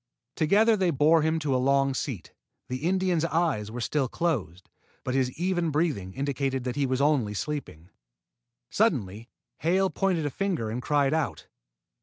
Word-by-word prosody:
Together 210 +8 +4
they 190 -3 +1
bore 155 +2 +4
him 160 +1 +1
to 150 -4 -1
a 130 - +1
long 135 +1 +2
seat. 125 - -5 0.4
The 130 - -2
Indian's 185 -3 +1
eyes 160 -11 0
were 120 +3 -6
still 135 +3 0
closed, 105 - -2 0.4
but 125 - -2
his 130 -1 +1
even 175 -1 0
breathing 145 - -1
indicated 135 -1 -2
that 125 -1 -3
he 140 -1 0
was 130 +1 0
only 135 -8 +2
sleeping. 100 - -5 0.8
Suddenly 105 +5 0 0.3
Hale 185 +4 +2
pointed 175 -1 0
a 145 - -1
finger 170 - -2
and 120 +3 -3
cried 145 +1 +1
out. 160 -2 -2
145 Hz, 160 wpm, -27 LUFS, 125-165 Hz, 0.8 s, Together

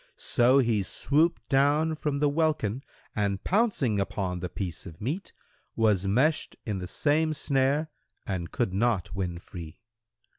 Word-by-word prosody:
So 125 +3 +3
he 115 -6 +3
swooped 150 - +1
down 145 +4 +3
from 150 -2 -2
the 145 +1 +2
welkin 145 -6 0 0.3
and 100 -2 -1
pouncing 185 - +1
upon 95 -2 -2
the 90 +1 -4
piece 90 0 -5
of 80 -2 -11
meat, 150 - -3 0.4
was 105 -4 +2
meshed 135 +10 +1
in 105 -4 -2
the 90 - -5
same 155 - +1
snare 145 +2 +1 0.3
and 90 -4 -3
could 115 -7 -1
not 95 -5 0
win 90 -3 -3
free. 85 -3 -9
120 Hz, 145 wpm, -28 LUFS, 95-150 Hz, 0.4 s, So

